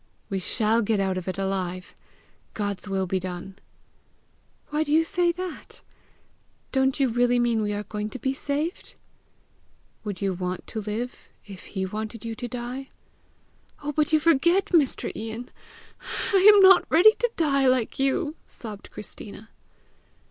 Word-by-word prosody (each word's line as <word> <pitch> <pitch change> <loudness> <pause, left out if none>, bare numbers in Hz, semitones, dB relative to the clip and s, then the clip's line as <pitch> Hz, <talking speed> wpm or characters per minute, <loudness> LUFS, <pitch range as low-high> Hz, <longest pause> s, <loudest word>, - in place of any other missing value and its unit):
"We 195 - 0
shall 220 +4 +1
get 215 -1 +1
out 190 -1 0
of 185 -1 -5
it 185 - -3
alive! 185 -2 -3 0.6
God's 205 -1 -3
will 190 -1 0
be 185 +1 -1
done!" 185 +1 -7 1.1
"Why 300 +1 +1
do 295 - -4
you 320 +2 +5
say 355 0 +2
that? 360 -1 -8 0.9
Don't 265 0 +1
you 270 - +4
really 245 +1 +2
mean 235 -2 +2
we 210 -1 -1
are 205 0 -3
going 210 0 -4
to 260 - -7
be 265 +1 -1
saved?" 290 +5 -3 1.1
"Would 205 -4 -5
you 195 -2 0
want 180 0 -4
to 220 - -5
live, 220 +4 -5 0.2
if 195 -3 -10
he 190 - 0
wanted 215 +3 -5
you 230 - -3
to 245 +2 -5
die?" 250 +3 -6 0.9
"Oh, 295 - -2
but 300 +1 +1
you 310 - +5
forget, 340 +4 +3
Mr. 300 -6 +2
Ian, 225 +2 -6 0.8
I 390 +1 +8
am 410 -1 +6
not 380 -1 +7
ready 360 +7 +7
to 485 - +2
die, 275 -4 +2
like 255 -2 +1
you!" 275 +3 0
sobbed 210 -3 -10
Christina. 215 +1 -10
235 Hz, 155 wpm, -25 LUFS, 200-295 Hz, 1.1 s, I